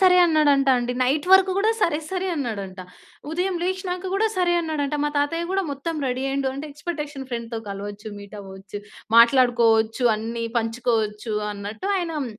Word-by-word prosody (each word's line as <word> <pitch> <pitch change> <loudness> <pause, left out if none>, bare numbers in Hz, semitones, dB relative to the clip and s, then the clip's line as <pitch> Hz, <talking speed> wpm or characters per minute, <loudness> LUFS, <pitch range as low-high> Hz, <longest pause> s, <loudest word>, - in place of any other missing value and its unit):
సరే." 370 -1 +6
అన్నాడంటాండి. 275 -6 +3
నైట్ 285 +6 +1
వరకు 380 0 +6
గూడా, 435 +3 +3
"సరే. 310 -3 +2
సరే." 380 0 -2
అన్నాడంట. 200 -9 -4 0.5
ఉదయం 360 +3 -1
లేచినాక 370 0 -2
గూడా, 440 +3 +2
"సరే." 355 -1 +2
అన్నాడంట. 305 -3 -2
మా - - +2
తాతయ్య 330 +4 0
కూడా 390 0 +1
మొత్తం 285 +4 -4
రెడీ 255 +1 -2
అయ్యిండు. 270 0 0
అంటే, 280 +3 -5
ఎక్స్పెటేషను 295 -3 -5
ఫ్రెండ్‌తో 235 -1 -4
కలవచ్చు, 205 +2 -6
మీటవ్వొచ్చు, 200 -1 -9 0.4
మాట్లాడుకోవచ్చు 235 -1 +4
అన్ని 230 +2 -4
పంచుకోవచ్చు 225 -2 -1 0.2
అన్నట్టు 205 - -6
ఆయనం 330 -6 -2
270 Hz, 140 wpm, -23 LUFS, 225-335 Hz, 0.5 s, సరే